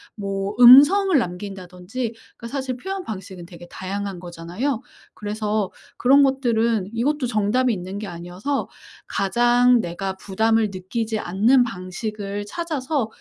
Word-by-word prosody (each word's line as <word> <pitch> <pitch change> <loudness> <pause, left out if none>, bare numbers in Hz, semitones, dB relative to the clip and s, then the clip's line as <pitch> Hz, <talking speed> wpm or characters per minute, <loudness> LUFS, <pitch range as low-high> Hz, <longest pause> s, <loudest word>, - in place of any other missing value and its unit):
뭐 195 0 -3
음성을 290 +9 +8
남긴다든지 190 +3 -4 0.2
그 235 - -8
사실 260 -1 -4
표현 385 +7 -5
방식은 190 - -8
되게 175 -1 -12
다양한 195 +1 -5
거잖아요. 180 +10 -4 0.3
그래서 210 -1 -2 0.3
그런 275 +3 +5
것들은 235 -6 +1
이것도 270 +4 0
정답이 235 +2 +1
있는 185 +1 -6
게 215 - -5
아니어서 180 +9 -4 0.4
가장 240 +3 +3
내가 190 +2 -4
부담을 220 +3 +1
느끼지 220 +4 -3
않는 220 +8 +3
방식을 205 0 -5
찾아서 290 -2 -2
215 Hz, 295 characters per minute, -22 LUFS, 190-250 Hz, 0.4 s, 음성을